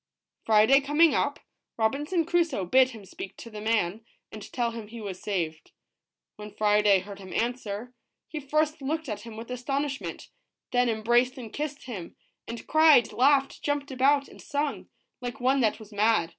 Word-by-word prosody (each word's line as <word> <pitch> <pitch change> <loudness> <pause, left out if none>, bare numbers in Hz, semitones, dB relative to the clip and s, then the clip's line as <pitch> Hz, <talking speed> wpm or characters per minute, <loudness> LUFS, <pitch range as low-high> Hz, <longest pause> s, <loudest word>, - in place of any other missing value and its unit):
Friday 220 +6 +6
coming 295 +3 +4
up, - - 0 0.4
Robinson 290 +10 0
Crusoe 335 - +1
bid 255 +7 +5
him 220 -5 -11
speak 190 +1 -9
to 230 - -10
the 210 -1 -7
man, 215 -2 0 0.3
and 215 -1 -9
tell 240 -2 0
him 225 -2 -7
he 230 +2 -9
was 195 -4 -6
saved. 165 -6 -3 0.6
When 210 0 -8
Friday 210 -2 +4
heard 200 +1 -10
him 190 -1 -10
answer, 235 -1 -3 0.3
he 310 - -5
first 305 +2 0
looked 310 +3 -2
at 210 -3 -4
him 225 0 -10
with 230 +2 -8
astonishment, 275 +3 -3 0.4
then 245 -1 +3
embraced 240 +3 +2
and 230 -4 -8
kissed 295 -1 -4
him, 205 -9 -7 0.3
and 230 0 -7
cried, 310 -6 +5
laughed, 275 +1 +3
jumped 290 -1 -2
about, 275 +2 +3
and - - -14
sung, 290 0 -3 0.3
like 245 +2 -5
one 260 +2 +2
that 225 -4 +2
was 220 -1 -13
mad. 210 -4 +2
240 Hz, 170 wpm, -27 LUFS, 210-280 Hz, 0.6 s, Friday